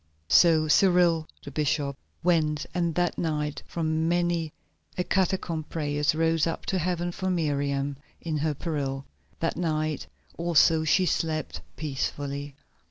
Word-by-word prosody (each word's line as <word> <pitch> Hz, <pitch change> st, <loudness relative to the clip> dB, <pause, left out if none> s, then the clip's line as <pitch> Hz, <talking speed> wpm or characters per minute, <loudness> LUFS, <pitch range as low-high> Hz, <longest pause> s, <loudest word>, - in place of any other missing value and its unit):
So 160 Hz, -, +6 dB
Cyril, 175 Hz, -1 st, +4 dB, 0.2 s
the -, -, -8 dB
bishop, 145 Hz, -2 st, 0 dB, 0.3 s
went, 155 Hz, -4 st, +2 dB
and 170 Hz, -3 st, 0 dB
that 175 Hz, -1 st, 0 dB
night 150 Hz, -3 st, -1 dB
from 160 Hz, -1 st, -1 dB
many 170 Hz, -2 st, +1 dB, 0.5 s
a 180 Hz, -, +1 dB
catacomb 180 Hz, -4 st, 0 dB
prayers 150 Hz, -1 st, 0 dB
rose 165 Hz, 0 st, +2 dB
up 165 Hz, -, -3 dB
to 190 Hz, -, +2 dB
Heaven 175 Hz, 0 st, -1 dB
for 185 Hz, +2 st, -3 dB
Miriam 140 Hz, -4 st, 0 dB, 0.2 s
in 160 Hz, -2 st, -3 dB
her 150 Hz, 0 st, 0 dB
peril. 140 Hz, -4 st, -3 dB, 0.4 s
That 165 Hz, -, 0 dB
night 155 Hz, -3 st, -1 dB, 0.3 s
also 165 Hz, -1 st, +4 dB
she 185 Hz, +4 st, +3 dB
slept 155 Hz, -, -1 dB
peacefully. 140 Hz, -1 st, -3 dB
160 Hz, 130 wpm, -27 LUFS, 150-170 Hz, 0.5 s, So